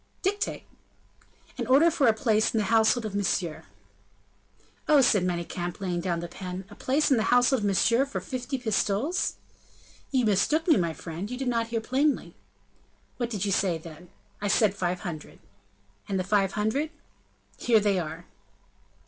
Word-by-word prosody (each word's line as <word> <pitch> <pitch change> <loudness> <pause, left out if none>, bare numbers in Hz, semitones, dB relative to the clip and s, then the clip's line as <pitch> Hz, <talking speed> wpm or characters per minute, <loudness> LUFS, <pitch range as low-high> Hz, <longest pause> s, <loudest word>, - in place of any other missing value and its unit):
"Dictate!" 410 +2 -1 1.0
"An - - -2
order 290 +6 +5
for 290 -5 +2
a - - +7
place 220 0 +1
in - - +2
the 215 - +2
household 225 +1 +3
of 210 - -4
Monsieur." 185 -5 -1 1.2
"Oh!" 300 -2 +7
said 215 -7 +3
Manicamp, 175 0 -3
laying 180 -3 -2
down 170 -2 -2
the 175 - -5
pen, 185 +1 -7
"a - - -11
place 280 +3 +1
in 265 - +5
the 220 - 0
household 245 +2 +4
of 210 - -3
Monsieur 230 +6 +3
for 280 - -4
fifty 255 +1 -4
pistoles?" 230 - 0 0.7
"You 255 -4 +1
mistook 260 - +2
me, 320 - +6
my 170 -2 0
friend; 170 +6 -6
you 250 - -5
did 265 0 -3
not 230 -1 0
hear 230 -1 -2
plainly." 270 +6 0 0.8
"What 240 -2 -2
did 210 -4 -2
you 200 - -1
say, 185 -3 +1
then?" 165 +2 -12 0.3
"I 205 - -1
said 205 0 +3
five 180 -2 -2
hundred." 160 -4 -7 0.7
"And 195 -1 0
the - - 0
five 195 0 +1
hundred?" 220 +9 0 0.7
"Here 230 -3 +4
they 200 -2 +1
are." 165 +1 -6
210 Hz, 170 wpm, -27 LUFS, 180-250 Hz, 1.2 s, a